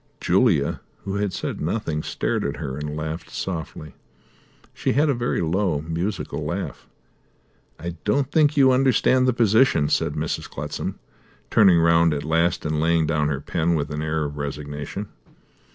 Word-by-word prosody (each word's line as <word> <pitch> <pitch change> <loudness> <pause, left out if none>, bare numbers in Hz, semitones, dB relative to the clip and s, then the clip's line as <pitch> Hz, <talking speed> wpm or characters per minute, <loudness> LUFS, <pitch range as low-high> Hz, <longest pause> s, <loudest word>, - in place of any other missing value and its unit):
Julia, 90 - +2 0.2
who 100 0 -3
had 100 -1 0
said - - -4
nothing, 80 -3 -2
stared - - -2
at 70 - -2
her, 70 -5 -4
and 75 +1 -5
laughed 80 +2 -5
softly. 80 -4 -5 0.8
She - - -1
had 150 +2 +3
a - - +3
very 120 -1 -1
low, 85 -2 0
musical 85 +1 -3
laugh. 85 +6 -4 0.9
"I 85 +1 -6
don't 135 +6 +1
think 150 -1 +3
you 135 -2 +6
understand 130 0 +3
the - - +5
position," 110 - +3
said - - +1
Mrs. - - -3
Clutsam, - - -5 0.5
turning 95 -6 +6
round 85 -1 +4
at 70 - -3
last 85 +2 +1
and 75 0 0
laying 80 0 +3
down 75 -1 +1
her 70 -2 -2
pen 85 +3 0
with 75 -1 -2
an 75 0 -3
air 80 0 -1
of 75 0 -6
resignation. 75 +6 -5
85 Hz, 160 wpm, -23 LUFS, 75-105 Hz, 0.9 s, you